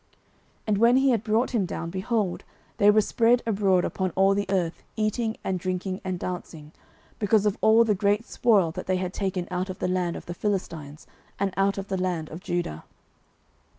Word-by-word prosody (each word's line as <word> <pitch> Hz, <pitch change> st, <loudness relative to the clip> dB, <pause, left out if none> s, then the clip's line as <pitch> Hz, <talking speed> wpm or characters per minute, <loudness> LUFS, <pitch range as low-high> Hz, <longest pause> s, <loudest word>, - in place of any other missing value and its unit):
09:030:016 -, -, -40 dB, 0.6 s
And 210 Hz, -2 st, +1 dB
when 235 Hz, +3 st, +5 dB
he 270 Hz, +1 st, +4 dB
had 225 Hz, -3 st, +1 dB
brought 225 Hz, +3 st, +1 dB
him 225 Hz, -6 st, +1 dB
down, 170 Hz, -, -4 dB
behold, 195 Hz, 0 st, -1 dB, 0.3 s
they 205 Hz, -, +5 dB
were 215 Hz, +1 st, +6 dB
spread 235 Hz, +3 st, +2 dB
abroad 195 Hz, -4 st, +2 dB
upon 190 Hz, -1 st, -1 dB
all 195 Hz, +1 st, +4 dB
the 200 Hz, 0 st, -1 dB
earth, 180 Hz, -4 st, -1 dB
eating 220 Hz, +1 st, -1 dB
and 185 Hz, -1 st, -1 dB
drinking, 185 Hz, +1 st, -3 dB
and 185 Hz, -2 st, -3 dB
dancing, 165 Hz, -4 st, -6 dB, 0.5 s
because 210 Hz, 0 st, +2 dB
of 210 Hz, -1 st, +2 dB
all 220 Hz, +1 st, +6 dB
the 220 Hz, -2 st, +2 dB
great 205 Hz, +3 st, +1 dB
spoil 205 Hz, -12 st, +2 dB
that -, -, -7 dB
they 185 Hz, 0 st, +1 dB
had 185 Hz, 0 st, -3 dB
taken 190 Hz, -3 st, -2 dB
out 180 Hz, +1 st, -2 dB
of 185 Hz, -, -5 dB
the -, -, -2 dB
land 180 Hz, -2 st, -1 dB
of -, -, -8 dB
the 175 Hz, -, -5 dB
Philistines, 170 Hz, -7 st, -4 dB, 0.3 s
and 195 Hz, -1 st, -1 dB
out 195 Hz, +1 st, +1 dB
of 195 Hz, 0 st, -5 dB
the 190 Hz, -2 st, -1 dB
land 175 Hz, -4 st, -2 dB
of 160 Hz, -, -7 dB
Judah. 175 Hz, -, -3 dB
195 Hz, 200 wpm, -26 LUFS, 180-215 Hz, 0.6 s, were